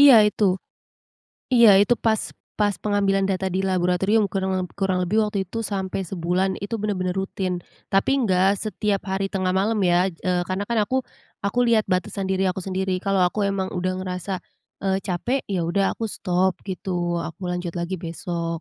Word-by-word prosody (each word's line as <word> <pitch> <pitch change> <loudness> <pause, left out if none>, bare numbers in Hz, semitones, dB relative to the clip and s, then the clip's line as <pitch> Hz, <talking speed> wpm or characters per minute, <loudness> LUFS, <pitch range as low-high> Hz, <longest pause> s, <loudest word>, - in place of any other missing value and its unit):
Iya 285 -3 +10
itu 210 0 +1 1.1
iya 235 -3 +8
itu 225 +4 +4
pas 220 -1 +3 0.4
pas 205 -2 +2
pengambilan 200 -2 +2
data 190 0 -1
di 190 - +1
laboratorium 190 +3 +2
kurang 190 -1 -1
leb 180 -1 -3
kurang 190 -1 +1
lebih 210 +5 +1
waktu 205 -2 -1
itu 225 +5 -5
sampai 190 -1 -2
sebulan 185 +1 0
itu 230 - -4
benar-benar 185 -4 -1
rutin, 190 -2 -2 0.3
tapi 195 +5 +3
nggak 190 0 +3
setiap 210 -2 -1
hari 195 +1 0
tengah 185 -1 0
malam 210 +3 +1
ya, 175 +2 +3
eee, 180 +1 -1
karena 190 +2 -1
kan 235 -1 +1
aku 260 +6 -1 0.5
aku 200 +5 -1
lihat 220 -2 +4
batasan 185 +2 -1
diri 190 0 +1
aku 190 - -5
sendiri. 190 -1 -1
Kalau 195 -1 +2
aku 200 +3 +1
emang 195 -1 -1
udah 185 0 -1
ngerasa, 185 0 -4 0.5
eee, 195 0 +1
capek, 235 +9 -1
ya 190 -3 -1
udah 190 +4 +1
aku 225 - -4
stop, 185 -1 0
gitu. 175 -2 -2
Aku 175 +3 -6
lanjut 180 -1 -3
lagi 170 +2 -2
besok. 170 0 -4
190 Hz, 175 wpm, -23 LUFS, 180-200 Hz, 1.1 s, Iya